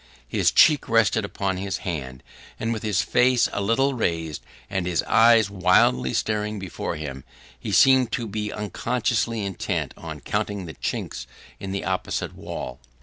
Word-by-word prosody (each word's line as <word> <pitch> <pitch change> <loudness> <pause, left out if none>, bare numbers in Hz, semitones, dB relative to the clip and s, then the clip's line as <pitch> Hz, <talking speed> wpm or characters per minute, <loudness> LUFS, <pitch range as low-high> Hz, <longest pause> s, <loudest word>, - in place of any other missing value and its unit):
His - - +2
cheek 150 -3 +5
rested 110 -1 +3
upon 95 -1 -2
his 95 -1 -3
hand; 65 -7 -5 0.4
and, 115 +1 -1
with 110 - -4
his 100 -6 +1
face 125 +5 +3
a 100 - -1
little 135 +7 +2
raised, 80 - -2 0.3
and 95 -3 -2
his 90 -2 0
eyes 115 -3 +5
wildly 65 -9 +3
staring 105 0 -1
before 95 -4 -4
him, 70 -4 -6 0.4
he - - -5
seemed 130 -3 +5
to 120 - -1
be 105 0 -3
unconsciously 115 0 -1
intent 95 -2 -3
on - - -8
counting 100 -3 -3
the 80 - -8
chinks - - -4 0.3
in 95 - -5
the 100 - -3
opposite - - -2
wall. 65 - -7
100 Hz, 155 wpm, -24 LUFS, 90-115 Hz, 0.4 s, cheek